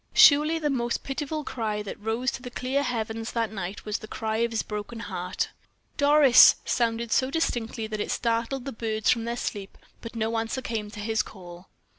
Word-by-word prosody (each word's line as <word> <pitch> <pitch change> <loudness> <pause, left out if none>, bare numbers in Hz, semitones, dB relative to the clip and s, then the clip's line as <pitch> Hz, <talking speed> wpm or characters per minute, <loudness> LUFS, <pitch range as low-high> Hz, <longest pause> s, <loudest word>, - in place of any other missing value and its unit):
Surely 305 +3 +7
the 300 -2 0
most 240 -3 -1
pitiful 295 +2 -3
cry 215 -6 -3
that 205 - -7
rose 225 +4 -1
to - - -7
the 250 - -7
clear 255 +3 -1
heavens 225 -3 -3
that 230 -2 0
night 195 -1 -6
was 210 0 -2
the 215 - -9
cry 220 0 -3
of 235 +1 +1
this 225 -1 -1
broken 210 +2 -6
heart. 180 -4 -3 0.5
"Doris!" 285 -3 +7
sounded 230 -1 0
so 260 0 +3
distinctly 240 -7 -1
that 215 -1 -4
it - - -3
startled 235 +2 -1
the 275 - -4
birds 220 -2 0
from 230 -2 0
their 235 +1 -3
sleep; 200 -4 -5 0.2
but 230 0 -8
no 225 0 0
answer 230 +4 -3
came 220 -3 -3
to 210 0 -10
his 220 +1 0
call. 175 -2 -11
230 Hz, 195 wpm, -26 LUFS, 215-255 Hz, 0.5 s, Surely